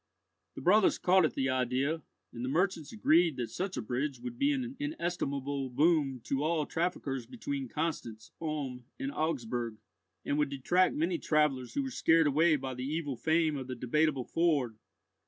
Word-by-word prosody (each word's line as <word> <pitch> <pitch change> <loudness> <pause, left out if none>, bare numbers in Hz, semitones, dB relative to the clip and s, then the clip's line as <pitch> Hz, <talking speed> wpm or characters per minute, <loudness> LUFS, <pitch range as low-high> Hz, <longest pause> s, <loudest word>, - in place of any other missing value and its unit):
The - - -7
brothers 195 +3 +4
caught 185 -1 +4
at 155 - -2
the 130 - 0
idea, 130 +5 0 0.3
and 120 - -6
the 130 - -1
merchants 165 -1 0
agreed 170 - +3
that 120 -2 -3
such 190 0 -3
a - - -2
bridge 130 +5 -2
would 245 0 -7
be 285 +1 +3
an 260 -2 -2
inestimable 145 - -2
boon 145 -2 +2
to 140 +1 -1
all 155 -1 +1
traffickers 145 -8 -2
between 275 +2 -4
Constance, 135 -9 -4
Ulm, 140 -6 -4
and 275 0 -2
Augsburg, 120 - -2 0.5
and 145 - 0
would 145 -2 +1
attract 175 +7 +2
many 165 +3 0
travellers 150 -5 +1
who 280 - +1
were 265 - -4
scared 165 -8 +4
away 155 +3 +4
by 135 -2 -4
the 125 0 -5
evil 145 0 -2
fame 160 +3 +2
of 130 -2 -5
the 130 - -4
Debateable 135 +2 +1
Ford. 145 -10 +1
150 Hz, 175 wpm, -31 LUFS, 130-175 Hz, 0.5 s, brothers